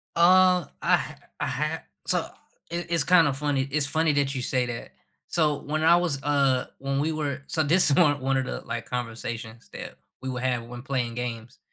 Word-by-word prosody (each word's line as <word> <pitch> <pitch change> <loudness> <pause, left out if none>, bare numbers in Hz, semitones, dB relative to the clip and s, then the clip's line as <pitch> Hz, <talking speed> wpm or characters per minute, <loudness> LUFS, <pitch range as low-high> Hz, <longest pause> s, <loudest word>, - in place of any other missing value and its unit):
Uh, 180 0 +5 0.2
I - - +4
ha - - -6 0.2
I - - 0
ha - - -2 0.2
so, - - +1 0.4
it 170 +1 -3
it's 170 -4 +2
kind 170 0 +5
of 135 - -1
funny 140 -2 0
it's 150 0 +1
funny 160 +1 +2
that 140 -1 0
you 130 - -2
say 125 0 0
that, 120 -1 -6 0.4
so, 150 -4 +1
when 155 +2 -2
I 165 +2 +7
was 170 -6 0
uh, 140 -3 +2
when 135 0 -1
we 155 +3 0
were 145 -2 -3
so, 160 - 0
this 165 +3 +4
is 140 - +3
one 145 -5 +4
one 135 0 +1
of 130 - 0
the, - - -4
like, 120 - -5
conversations 115 -1 -5
that - - -8 0.3
we 130 - -4
would 125 -1 -4
have 125 -2 0
when 120 +1 -9
playing 125 -4 -2
games, 120 -1 -5
140 Hz, 210 wpm, -26 LUFS, 125-155 Hz, 0.4 s, I